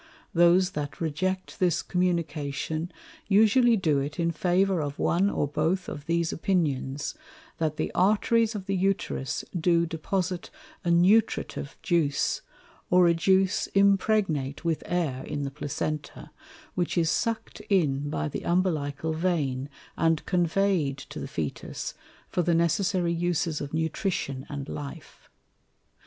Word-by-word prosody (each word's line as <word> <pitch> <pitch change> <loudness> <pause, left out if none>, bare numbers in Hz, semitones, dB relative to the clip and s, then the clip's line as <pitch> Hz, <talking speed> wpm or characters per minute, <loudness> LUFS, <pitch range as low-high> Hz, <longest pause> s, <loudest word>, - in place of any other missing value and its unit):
Those 175 +2 +5
that 145 -3 -5
reject 185 +4 -2
this 175 -3 +2
Communication 165 -2 -1 0.4
usually 220 +3 +5
do 155 -7 +2
it 145 +4 -4
in 170 0 +2
favour 180 +2 +2
of 145 -1 -4
one 190 +4 +2
or 145 - 0
both 160 +6 0
of 145 0 -7
these 170 0 +1
Opinions, 145 -6 -1 0.5
that 155 -2 -1
the - - -1
Arteries 220 +3 +3
of 195 -2 -5
the 195 0 -1
Uterus 190 -7 -1
do 170 0 +3
deposite 175 +2 -2 0.3
a 175 - -1
Nutritive 180 -3 +2
Juice, 155 -6 +1 0.5
or 180 -1 +6
a 170 - +5
Juice 190 +3 +2
impregnate 195 -8 +2
with 165 -2 0
Air 160 -8 -1
in 145 -1 -4
the 140 - -3
Placenta, 145 +1 -4 0.4
which 175 0 -1
is 165 -2 +3
suck'd 225 -2 -2
in 145 -7 +2
by 150 - -1
the 150 - -4
Umbilical 160 -4 0
Vein, 150 -6 -1 0.3
and 165 -1 +1
convey'd 175 -5 +1
to 135 - -9
the - - -5
Fœtus, 80 - -4 0.3
for 180 - 0
the 170 0 +2
necessary 175 +1 +1
Uses 170 -2 0
of 145 - -5
Nutrition 160 -4 -2
and 140 -1 -5
Life. 145 +2 -8
170 Hz, 135 wpm, -27 LUFS, 150-185 Hz, 0.5 s, or